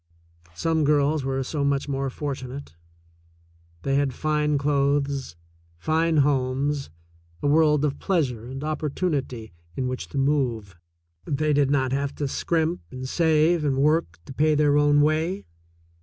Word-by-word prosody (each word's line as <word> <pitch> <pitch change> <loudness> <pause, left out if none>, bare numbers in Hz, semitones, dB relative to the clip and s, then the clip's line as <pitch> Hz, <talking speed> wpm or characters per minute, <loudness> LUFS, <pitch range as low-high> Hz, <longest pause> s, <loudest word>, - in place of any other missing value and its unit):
Some 160 - 0
girls 145 0 +2
were 135 0 -1
so 145 +2 -3
much 140 0 0
more 135 -1 -2
fortunate. 135 - -6 1.1
They 135 0 +1
had 140 -3 0
fine 150 -1 0
clothes, 140 - 0 0.4
fine 160 - +1
homes, 140 +1 0 0.5
a - - +2
world 150 0 +4
of 145 -1 -2
pleasure 135 - 0
and 135 +2 -6
opportunity 145 - -3 0.2
in 130 - -2
which 130 0 -4
to - - -6
move. 125 -8 0 0.5
They 150 +1 0
did 140 -1 +3
not 135 -3 +1
have 140 +1 -2
to 145 - -2
scrimp 165 +4 -1
and 130 0 -6
save 160 +1 +2
and 140 -3 0
work 150 - +1
to - - -9
pay 155 +3 +2
their 145 -1 +3
own 145 0 +4
way. 160 +5 0
145 Hz, 140 wpm, -24 LUFS, 135-150 Hz, 1.1 s, world